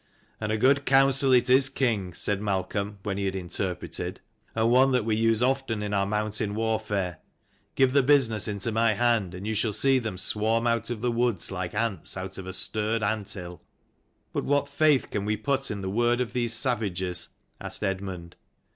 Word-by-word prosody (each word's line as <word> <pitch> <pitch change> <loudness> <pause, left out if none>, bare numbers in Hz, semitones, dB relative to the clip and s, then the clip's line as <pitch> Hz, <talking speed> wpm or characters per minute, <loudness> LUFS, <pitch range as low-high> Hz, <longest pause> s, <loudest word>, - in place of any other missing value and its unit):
" - - -36
And 105 0 -1
a 110 - +1
good 135 +5 +3
counsel 135 0 +4
it 125 -1 +5
is, 130 +1 +5
king," 115 -9 -1
said 100 -1 -1
Malcolm, 100 +1 -2
when 100 -2 -2
he 100 - -1
had 95 0 -1
interpreted: 90 0 -4 0.4
"and 115 +1 +2
one 130 +2 +5
that 125 -4 +1
we 110 -1 +1
use 115 +1 +2
often 130 -5 0
in 105 0 -3
our 100 -1 +1
mountain 105 0 -1
warfare. 105 -6 -1 0.6
Give 130 -1 +3
the 140 - +5
business 125 -7 +3
into 105 +2 -2
my 115 0 +3
hand, 110 -5 +1
and 95 +2 -7
you 110 - -1
shall 110 0 0
see 135 +5 +3
them 110 -6 -4
swarm 110 +4 0
out 115 -1 +1
of 120 -3 -4
the 120 0 +1
woods 115 -7 0
like 90 0 -4
ants 105 -6 -1
out 95 +1 -6
of 95 - -8
a 95 - -5
stirred 110 +3 -1
anthill." 100 -5 -3 0.4
" - - -44
But - - -1
what 145 0 +1
faith 145 -1 +2
can 100 - -2
we 105 +1 -1
put 135 +1 -1
in 100 -2 -4
the 95 - -4
word 120 +4 +2
of 125 -5 -2
these 120 -2 0
savages?" 100 -7 -2 0.3
asked - - -3
Eadmund. 95 -3 -4
110 Hz, 200 wpm, -26 LUFS, 100-120 Hz, 0.6 s, it